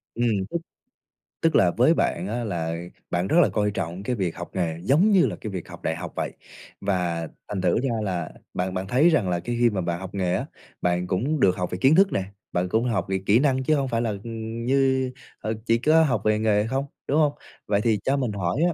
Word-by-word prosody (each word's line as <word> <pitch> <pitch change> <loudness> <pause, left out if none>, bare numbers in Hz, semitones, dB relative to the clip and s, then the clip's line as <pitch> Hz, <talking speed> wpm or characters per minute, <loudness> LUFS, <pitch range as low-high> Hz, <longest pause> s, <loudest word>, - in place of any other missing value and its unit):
Ừm, 120 +1 +1 0.2
tức 170 - -1 0.8
tức 165 -2 +2
là 90 - +5
với 125 - +4
bạn 90 - 0
á 120 +3 -2
là 85 -6 -2 0.3
bạn 90 +1 0
rất 160 - +2
là - - +4
coi 105 -1 0
trọng 90 0 -4
cái 125 +4 -1
việc 95 -6 -2
học 85 - -6
nghề 85 -4 -1
giống 155 - +4
như 190 -6 +5
là 105 -8 -2
cái 110 - -5
việc 90 -3 -5
học - - -11
đại 80 - 0
học 85 -1 -7
vậy. - - -2 0.5
Và 90 -4 -1 0.2
thành 100 -3 -3
thử 90 +3 +2
ra 135 - +1
là 90 -5 -2 0.2
bạn 90 +1 -2
bạn 95 +1 -3
thấy 135 - +4
rằng 130 - +2
là 90 -1 0
cái 120 +6 -3
khi 120 -1 +5
mà 100 -4 -2
bạn 85 0 -2
học 95 0 -6
nghề 90 -2 0
á, - - -2 0.4
bạn 90 0 0
cũng 125 +12 0
được 95 -6 +4
học 90 0 -2
về 90 - -2
kiến 135 +4 +6
thức 195 +2 +5
nè, 95 - 0 0.3
bạn 90 +1 0
cũng 115 +4 +1
học 110 -6 0
về 95 0 0
kỹ 105 +4 +5
năng 130 -2 +2
chứ 155 +4 +3
hông 140 -2 0
phải 115 -2 0
là, 115 - 0
ừm, 115 0 -5
như, 130 -1 +2 0.3
ờ, 110 +1 -2
chỉ 115 - +3
có 155 +6 +4
học 150 - +1
về 110 0 +3
nghề 105 -1 +2
không, 135 +4 -1 0.2
đúng 145 - +2
hông? 150 -2 +3 0.3
Vậy 100 0 +2
thì 110 -2 +2
cho 135 +1 +1
mình 125 -5 -1
hỏi 100 - -1
á, 175 - 0
110 Hz, 250 wpm, -25 LUFS, 90-130 Hz, 0.8 s, kiến